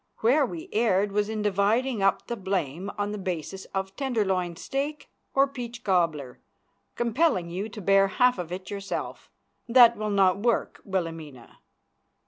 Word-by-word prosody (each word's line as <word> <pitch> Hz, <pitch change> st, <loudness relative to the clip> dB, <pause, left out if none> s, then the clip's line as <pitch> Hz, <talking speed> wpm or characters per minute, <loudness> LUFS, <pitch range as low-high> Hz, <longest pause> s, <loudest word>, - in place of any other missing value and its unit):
Where 260 Hz, +5 st, +4 dB
we 335 Hz, +5 st, -7 dB
erred 205 Hz, -3 st, +2 dB
was 205 Hz, +1 st, 0 dB
in 215 Hz, -1 st, -3 dB
dividing 210 Hz, +4 st, +1 dB
up 195 Hz, 0 st, +2 dB
the 235 Hz, -, -3 dB
blame 190 Hz, -, -3 dB
on 205 Hz, 0 st, -1 dB
the 210 Hz, -, -5 dB
basis 185 Hz, 0 st, -4 dB
of 195 Hz, 0 st, -4 dB
tenderloin 195 Hz, -10 st, -1 dB
steak 280 Hz, -, -4 dB, 0.2 s
or 275 Hz, +1 st, +5 dB
peach 240 Hz, -3 st, -7 dB
cobbler, 165 Hz, -9 st, 0 dB, 0.6 s
compelling 235 Hz, -, +1 dB
you 195 Hz, +5 st, -4 dB
to 210 Hz, 0 st, -9 dB
bear 195 Hz, +1 st, +4 dB
half 250 Hz, +3 st, +2 dB
of 175 Hz, -1 st, -5 dB
it 185 Hz, +2 st, -6 dB
yourself. 200 Hz, -1 st, -5 dB, 0.4 s
That 235 Hz, -1 st, +7 dB
will 215 Hz, 0 st, -3 dB
not 195 Hz, -2 st, +3 dB
work, 235 Hz, +2 st, 0 dB
Wilhelmina. 165 Hz, -, -5 dB
200 Hz, 150 wpm, -26 LUFS, 185-235 Hz, 0.6 s, That